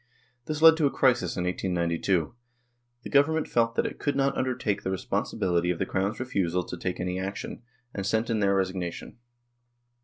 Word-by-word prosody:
This 155 0 -3
led 160 0 +9
to 155 -3 +3
a - - +1
crisis 125 -6 +1
in 90 - -1
1892; 90 -1 0 0.7
the - - -7
Government 155 +3 +3
felt 115 0 +1
that - - +1
it - - -5
could 145 - -1
not 135 0 +1
undertake 125 -6 -1
the - - -3
responsibility 90 -1 -1
of 90 - 0
the 95 - -1
Crown's 95 +3 -1
refusal 90 -8 -1
to 90 - -7
take 90 +1 -4
any 90 +1 -2
action, 95 +3 -5 0.3
and 100 - -3
sent 110 +4 0
in 110 - +1
their 100 -1 +2
resignation. 95 +2 -3
100 Hz, 180 wpm, -27 LUFS, 90-125 Hz, 0.7 s, led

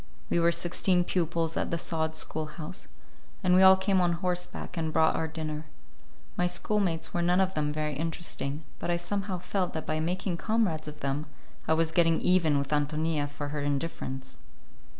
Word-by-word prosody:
We - - +3
were 170 0 +4
sixteen 180 +1 +2
pupils 165 -2 0
at - - -1
the 170 - 0
sod 160 -1 -1
schoolhouse, 155 0 -4 0.6
and 180 - +4
we 185 - +6
all 190 0 +9
came 190 0 +2
on 175 -1 +3
horseback 180 +1 -3
and 160 -2 -1
brought 160 0 +3
our 160 - 0
dinner. 155 -1 -5 0.7
My 180 - +2
schoolmates 180 -1 0
were 175 - 0
none 175 +2 +3
of 190 0 +2
them 150 -2 0
very 150 0 -2
interesting, 160 -1 -3 0.2
but - - -3
I 175 - +2
somehow 195 +2 -2
felt 180 +1 -2
that 160 - -4
by 155 0 -1
making 175 +2 -1
comrades 195 -8 0
of 150 0 -8
them 140 +3 -2 0.4
I 160 - +4
was 160 0 +1
getting 165 -1 +3
even 170 -5 +3
with 140 0 -2
Ántonia 150 0 0
for 145 0 -5
her 150 0 -3
indifference. 140 -2 -3
165 Hz, 180 wpm, -29 LUFS, 155-180 Hz, 0.7 s, all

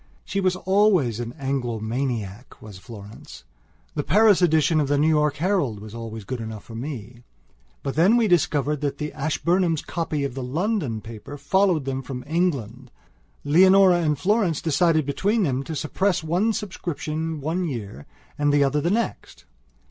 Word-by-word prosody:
She 200 - -2
was 185 -1 +1
always 185 - +2
an 120 -1 -4
Anglo 135 -5 -3
maniac, 115 -2 -4
was 105 -4 -11
Florence; 100 - -12 0.5
the - - -1
Paris 205 - +4
edition 160 -2 +3
of 145 - +1
the 145 +1 +1
New 150 +2 +3
York 150 -2 +2
Herald 160 - 0
was 105 +1 -10
always 115 -2 -7
good 125 +3 -5
enough 110 -2 -7
for 115 - -12
me. 120 -1 -7 0.6
But 135 - -3
when 195 +9 +5
we 230 -2 +3
discovered 150 -5 +1
that 140 -1 -2
the 150 0 -4
Ashburnhams' 165 +3 0
copy 160 -4 -2
of 140 -3 -3
the 135 - -5
London 145 - -2
paper 115 +6 -9
followed 175 +1 +1
them 135 0 -2
from 125 -1 -7
England, 135 - -2 0.5
Leonora 185 +3 +5
and 150 -3 +1
Florence 190 - +1
decided 160 -1 +2
between 200 +10 0
them 135 -5 0
to 160 - -5
suppress 180 +4 0
one 180 +8 +1
subscription 160 -6 -4
one 160 +6 -2
year 105 - -6 0.3
and 145 0 +2
the 145 0 +4
other 140 +2 +1
the 170 - 0
next. 225 +4 -3
150 Hz, 165 wpm, -24 LUFS, 125-175 Hz, 0.6 s, when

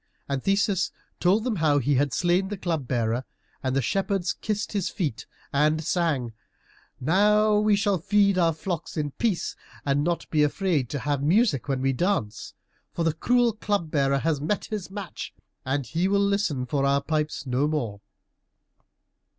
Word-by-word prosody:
And 140 -1 -2
Theseus 195 -2 +1 0.3
told 195 +5 +3
them 235 -4 -1
how 155 -3 +3
he 145 +1 +1
had 140 +1 +2
slain 175 +5 +2
the 205 +1 -4
Club 165 -8 -2
bearer, 120 0 0 0.4
and 130 0 -1
the 135 - +1
shepherds 195 - 0
kissed 210 -1 -3
his 200 -4 -1
feet 150 - -3 0.3
and 155 +3 +2
sang, 150 -9 0 0.7
"Now 210 +7 +4
we 210 0 +4
shall 200 -2 +1
feed 200 +2 +3
our 170 -2 +3
flocks 165 +1 -5
in 145 -2 -1
peace, 195 0 -1 0.3
and 140 0 +2
not 170 +1 -1
be 155 - +3
afraid 150 - +1
to 145 - -3
have 140 +1 -1
music 160 - +2
when 135 -2 -1
we 135 0 +2
dance. 120 - -1 0.4
For 170 - -1
the 165 -1 +2
cruel 245 +7 +2
Club 205 -6 -2
bearer 140 -2 +2
has 150 0 0
met 180 +7 -1
his 210 -4 -5
match, 195 -5 -7 0.3
and 135 +1 -1
he 165 +8 0
will 200 +1 +2
listen 200 -10 0
for 135 +2 -1
our 140 0 +2
pipes 155 -2 -2
no 130 +3 +1
more." 120 -10 -2
160 Hz, 170 wpm, -26 LUFS, 140-195 Hz, 0.7 s, Now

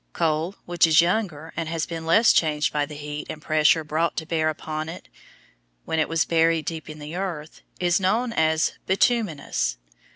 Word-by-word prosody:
Coal 165 +3 0
which 175 -1 +3
is 160 -1 +5
younger 170 -3 0
and 165 -1 -3
has 165 -1 -2
been 165 -1 -6
less 220 +8 +5
changed 155 0 +1
by 145 -1 0
the 150 - -9
heat 150 0 -6
and 155 - -6
pressure 155 +1 +3
brought 155 +2 -1
to 160 - -2
bear 160 -1 0
upon 155 0 -4
it 165 - -9 0.8
when 160 - -1
it 155 - +1
was 165 0 +1
buried 165 -1 +2
deep 160 -1 -5
in 155 - -8
the 150 +2 -8
earth, 170 -5 -5 0.2
is 175 0 +2
known 230 +6 +1
as 160 -2 +2
bituminous. 185 - 0
160 Hz, 185 wpm, -24 LUFS, 155-170 Hz, 0.8 s, is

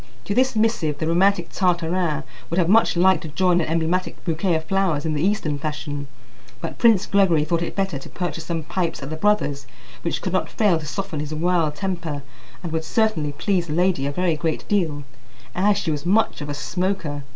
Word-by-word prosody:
To 200 - -1
this 255 +2 +2
missive 215 -9 +1
the 160 - -2
romantic 190 +5 +2
Tartarin 170 -4 0 0.3
would 170 - -2
have 175 -3 +3
much 215 -2 +4
liked 185 -1 +4
to - - -6
join 175 +3 +2
an - - -2
emblematic 165 +3 -1
bouquet 170 +1 +1
of 160 - -1
flowers 185 -5 0
in 160 - 0
the 145 - -1
Eastern 165 -6 0
fashion; 145 -1 -4 0.5
but - - -6
Prince 225 -6 +5
Gregory 190 -6 +3
thought 170 +1 0
it 170 - -4
better 195 -8 -1
to - - -11
purchase 175 -2 -4
some 165 -2 -3
pipes 170 -2 -2
at 135 - -6
the - - -2
brother's, 160 -6 +1 0.3
which - - -2
could - - -2
not - - 0
fail 205 -8 +2
to 150 - -8
soften 195 -1 -4
his 150 +1 -4
wild 165 -2 +1
temper, 165 -5 -3 0.4
and 170 - -4
would 160 0 -1
certainly 165 -8 0
please 180 +3 0
the 150 - -3
lady 175 -5 +1
a - - -1
very 175 +2 +1
great 160 +1 -2
deal, 160 -8 0 0.5
as 200 +3 +3
she 160 - -1
was 145 -2 -2
much 200 0 +2
of 145 - -5
a 145 - -3
smoker. 170 -2 -2
170 Hz, 205 wpm, -23 LUFS, 155-190 Hz, 0.5 s, Prince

